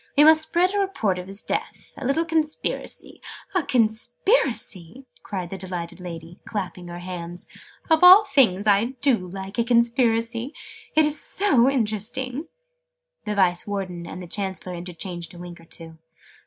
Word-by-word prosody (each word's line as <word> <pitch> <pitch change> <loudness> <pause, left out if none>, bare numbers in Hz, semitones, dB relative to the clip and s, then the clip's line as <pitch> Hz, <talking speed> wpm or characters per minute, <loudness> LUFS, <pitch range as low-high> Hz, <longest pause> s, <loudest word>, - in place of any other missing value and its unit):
We 295 - +8
must 315 +1 +7
spread 350 +4 +1
a 410 - +1
report 225 - 0
of 180 - -8
his 195 +1 -4
death. - - -4
A - - -8
little 275 +6 +1
Conspiracy 320 -2 -2 0.2
" - - -20
"A 370 - +4
Conspiracy!" 240 - 0 0.2
cried 185 -4 -5
the 195 - -6
delighted 180 -2 -5
lady, 170 0 -8
clapping 185 -4 -5
her 175 0 -7
hands. 175 -1 -7 0.4
"Of 320 0 +3
all 375 +4 +10
things, 225 -9 +3
I 215 +5 +3
do 230 -10 +2
like 195 +4 -6
a - - +4
Conspiracy! 235 +1 +1 0.4
It's 305 -1 +3
so 275 -11 +3
interesting!" 255 - -2 0.8
The 210 -1 -2
Vice 180 -2 +2
Warden 185 -4 -4
and 180 - -7
the - - -9
Chancellor 190 -1 -3
interchanged 175 -1 -6
a - - -11
wink 175 0 -9
or 165 - -16
two. 165 -1 -10
210 Hz, 155 wpm, -24 LUFS, 180-275 Hz, 0.8 s, all